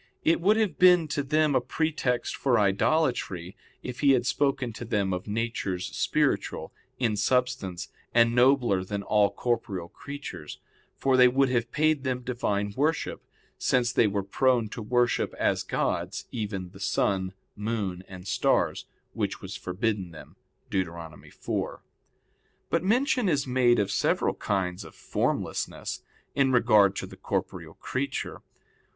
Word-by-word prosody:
It 165 +1 +3
would 210 +5 +4
have 210 -8 0
been 180 -3 +6
to 145 -1 0
them 150 +1 +2
a - - +3
pretext 155 -6 -1
for 130 -3 +2
idolatry 100 - +1 0.3
if 125 -1 -6
he 140 -2 +5
had 125 -2 +2
spoken 135 -2 0
to 115 - -7
them 100 -4 0
of 90 +2 -4
natures 105 -4 -2
spiritual - - 0 0.2
in 115 -4 +1
substance 110 -4 0 0.2
and 115 0 +4
nobler 120 -6 +4
than 100 +1 -4
all 105 0 +3
corporeal 105 -5 -2
creatures; 140 - -8 0.4
for 135 -1 +2
they 125 0 +8
would 135 +2 +3
have 120 -2 0
paid 155 -2 +2
them 130 -2 -1
Divine 105 -5 -1
worship, 155 +4 -1 0.4
since 125 -1 +2
they 115 - +4
were 100 -1 -1
prone 120 +2 +2
to 115 - -6
worship 120 +2 +1
as - - +1
gods - - -2
even 100 -5 -4
the 95 - -14
sun, 95 -1 0 0.2
moon, 105 -4 -3
and 90 -1 -10
stars, - - +1 0.3
which - - -2
was - - -7
forbidden 95 0 -2
them 80 - -13 0.4
(Deut. 85 -4 -3 0.2
4). - - -4 0.9
But 165 0 +1
mention 245 +1 +2
is 145 -4 +1
made 125 -2 +3
of 100 - 0
several - - +1
kinds 90 -3 -2
of - - -13
formlessness, - - -2 0.3
in 135 -1 +2
regard 110 -5 +5
to - - -3
the - - -12
corporeal - - -4
creature. - - -4
120 Hz, 145 wpm, -27 LUFS, 100-135 Hz, 0.9 s, they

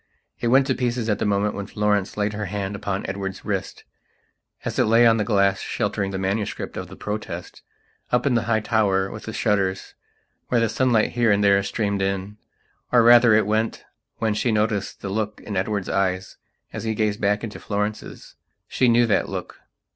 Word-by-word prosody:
It 120 - -1
went 130 +3 +5
to 130 - +1
pieces 120 -2 -1
at 105 - 0
the - - 0
moment 105 +1 +1
when 100 -1 -5
Florence 105 -2 0
laid 105 0 0
her 105 0 -3
hand 100 +1 -3
upon 100 -1 -3
Edward's 95 0 -5
wrist, - - -3 0.8
as - - -3
it - - +4
lay 115 +2 +5
on 115 -1 +5
the 105 - +1
glass 100 -2 +2
sheltering 100 -1 -2
the 95 - -4
manuscript 100 +3 -3
of - - -5
the - - -11
Protest, 105 +1 -6 0.5
up 125 +2 +2
in 140 - +2
the 115 - +2
high 110 -1 +2
tower 100 -4 +1
with 105 - -9
the 110 - -5
shutters 100 -4 -1 0.5
where 120 - +2
the 115 -1 +1
sunlight 115 -1 +2
here 120 -2 +2
and 100 0 +2
there 100 -1 +5
streamed 100 0 -2
in. 95 +1 -2 0.5
Or, 120 -2 +5
rather, 120 -1 +7
it 110 - +3
went 110 +2 -1 0.3
when 110 -1 0
she 115 +3 0
noticed 105 -1 -1
the 100 - -4
look 105 +1 -2
in 105 - -6
Edward's 100 +1 -1
eyes 95 -1 -1 0.4
as - - -5
he 110 -1 -1
gazed 105 -1 -1
back 105 +1 +1
into 110 -2 -6
Florence's. 105 +1 -4 0.3
She 125 - +2
knew 120 +1 +5
that 110 - +1
look. - - -6
105 Hz, 195 wpm, -23 LUFS, 100-115 Hz, 0.8 s, rather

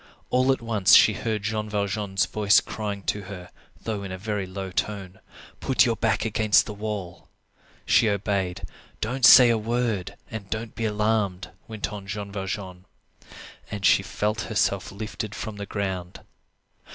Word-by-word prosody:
All 130 +1 +3
at 130 -3 -1
once 110 -5 +5
she - - +7
heard 110 -3 -3
Jean 110 0 -2
Valjean's 100 -2 -1
voice 105 +2 +4
crying 100 -2 -5
to 105 - -1
her, 90 -3 -9 0.3
though 110 -3 -3
in 95 -1 -6
a 95 - -5
very 100 -1 -3
low 95 0 -6
tone:— 95 -1 -3 0.4
"Put 130 0 +3
your 115 -2 +1
back 110 -1 0
against 110 -1 +3
the 105 - -6
wall." 105 -4 -6 0.6
She 110 - +4
obeyed. 100 -2 -1 0.4
"Don't 125 +4 -3
say 125 -1 +9
a 115 - +1
word, 115 -4 -1 0.2
and 105 -3 -7
don't 110 0 -4
be 115 - -3
alarmed," 105 -3 0 0.2
went 110 -2 -5
on 100 -2 -8
Jean 100 0 -5
Valjean. 95 -2 -5 0.8
And 100 -2 -4
she 95 - +6
felt 105 +3 -2
herself 100 -3 0
lifted 105 0 -6
from 110 -2 -6
the 100 0 -6
ground. 95 -3 -4
105 Hz, 160 wpm, -25 LUFS, 95-110 Hz, 0.8 s, say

